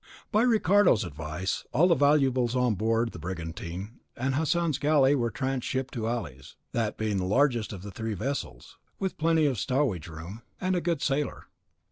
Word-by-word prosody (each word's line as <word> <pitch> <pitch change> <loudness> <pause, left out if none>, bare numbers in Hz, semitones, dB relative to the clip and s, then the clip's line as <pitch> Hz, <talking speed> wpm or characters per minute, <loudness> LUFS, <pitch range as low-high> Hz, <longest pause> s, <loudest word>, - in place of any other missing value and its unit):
By 215 0 +3
Ricardo's 205 - +4
advice, 80 +2 -4
all 160 +8 +5
the - - +6
valuables 135 -4 +3
on 125 -2 +2
board 115 +3 0
the - - -9
brigantine 90 +4 -6 0.2
and 130 +2 0
Hassan's 160 0 +1
galley 145 -2 +4
were 120 -4 +1
transhipped 130 +1 -2
to 115 -3 -2
Ali's, 75 - -5 0.2
that 115 -3 -1
being 110 -2 -1
the 95 - -1
largest 120 +2 +2
of 95 -3 -8
the 100 - -7
three 110 +2 -4
vessels, 110 - -5 0.2
with 190 -1 -3
plenty 160 0 +3
of 130 -7 +1
stowage 125 - 0
room, 85 +7 -8 0.2
and 185 0 0
a 175 - 0
good 170 -3 -1
sailer. 140 0 -1
125 Hz, 170 wpm, -28 LUFS, 100-145 Hz, 0.2 s, the